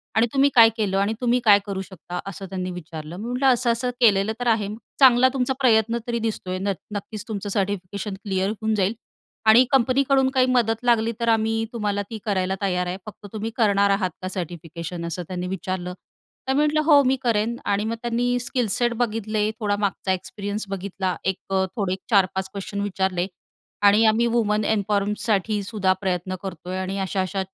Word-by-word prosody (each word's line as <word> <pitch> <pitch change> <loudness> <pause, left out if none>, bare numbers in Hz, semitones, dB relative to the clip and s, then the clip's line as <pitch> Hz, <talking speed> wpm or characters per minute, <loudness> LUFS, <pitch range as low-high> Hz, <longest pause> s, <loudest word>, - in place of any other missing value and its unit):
आणि 225 +2 +4
तुम्ही 275 +1 +4
काय 230 -2 +9
केलं? 200 -3 0
आणि 200 +2 +1
तुम्ही 245 0 +2
काय 205 -2 +7
करू 195 -2 -3
शकता?" 180 -1 -8
असं 195 0 -6
त्यांनी 185 -1 -4
विचारलं. 165 -1 -8
मी 210 - -6
म्हटलं 250 +3 +1
असं-असं 240 0 0
केलेलं 210 -2 +4
तर 245 - -2
आहे. 220 -3 +2 0.3
"चांगला 260 -1 +7
तुमचा 265 -1 0
प्रयत्न 230 -3 +3
तरी 235 -1 -1
दिसतोय 210 -5 -3
नत 195 0 -1 0.2
नक्कीच 210 +2 -6
तुमचं 205 -2 -4
सर्टिफिकेशन 200 0 -2
क्लिअर 190 -1 0
होऊन 220 +1 -2
जाईल. 200 +1 +1 0.5
आणि 220 +3 +8
कंपनीकडून 265 +1 +3
काही 260 -1 +3
मदत 230 -2 +1
लागली 230 -2 +3
तर 235 - -1
आम्ही 225 0 +1
तुम्हाला 205 -3 -1
ती 225 - -5
करायला 190 -2 0
तयार 180 -2 0
आहे. 180 +1 -3
फक्त 215 -1 -11
तुम्ही 220 +1 -3
करणार 200 -3 +3
आहात 195 -2 +1
का 185 - -4
सर्टिफिकेशन?" 170 -1 -6
असं 170 +1 -4
त्यांनी 180 -1 -4
विचारलं. 185 -1 -4 0.5
तर 265 - +2
मी 275 - +2
म्हटलं, 300 +1 +2
"हो 295 -2 +6
मी 260 0 +3
करेन." 230 -1 +1
आणि 200 0 +1
मग 225 +1 -2
त्यांनी 245 +1 0
स्किल-सेट 240 -1 0
बघितले. 215 -2 0
थोडा 205 -2 0
मागचा 200 -1 -1
एक्सपिरियन्स 205 +3 -4
बघितला. 190 -1 -3
एक 190 0 0 0.2
अ, 190 0 +2
थोडे 195 -5 -1
एक 190 - -5
4-5 190 -3 +2
क्वेस्शन 200 +1 -5
विचारले. 190 -2 -1 0.6
आणि 210 +3 +5
आम्ही 220 +2 +4
वुमन 215 -3 +1
इन्फॉर्मसाठीसुद्धा 205 -1 0
प्रयत्न 185 -1 -2
करतोय 185 -1 -5
आणि 190 +1 -3
अशा-अशा 190 0 -2
205 Hz, 175 wpm, -23 LUFS, 190-230 Hz, 0.6 s, काय